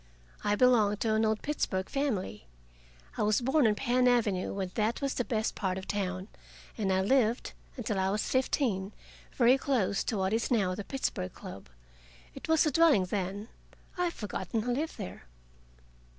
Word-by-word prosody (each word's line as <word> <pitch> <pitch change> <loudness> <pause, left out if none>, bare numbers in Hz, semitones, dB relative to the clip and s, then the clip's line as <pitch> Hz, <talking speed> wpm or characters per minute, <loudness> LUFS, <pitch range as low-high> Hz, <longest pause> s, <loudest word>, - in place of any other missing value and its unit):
I 205 - +2
belong 215 -4 +4
to 220 +1 0
an 220 +1 +2
old 215 0 0
Pittsburgh 190 -10 -1
family. 220 - -2 0.7
I - - -1
was 210 0 +3
born 265 +1 +3
on 210 - +2
Penn 250 +1 +2
Avenue, 220 -7 +2
when 190 -2 -3
that 220 +1 0
was 275 -1 -1
the 245 - -1
best 220 -2 -1
part 190 -3 -2
of 190 - -7
town, 190 -2 -2 0.5
and 200 -4 -1
I 190 0 +2
lived, 235 +2 +1 0.2
until 215 -5 -2
I 190 0 +1
was 205 +2 -1
fifteen, 230 -7 0 0.4
very 250 +2 +4
close 230 -9 0
to 220 - -1
what 190 +1 0
is 230 +1 0
now 200 -7 +2
the 200 - -5
Pittsburgh 260 - -3
Club. - - -10 0.6
It - - -9
was 320 -1 +4
a 305 - +2
dwelling 290 - +5
then; 200 +3 -3 0.5
I 360 - 0
have 340 - -2
forgotten 210 +1 -3
who 245 +1 0
lived 305 +5 -3
there. 90 -8 -7
215 Hz, 180 wpm, -30 LUFS, 195-255 Hz, 0.7 s, dwelling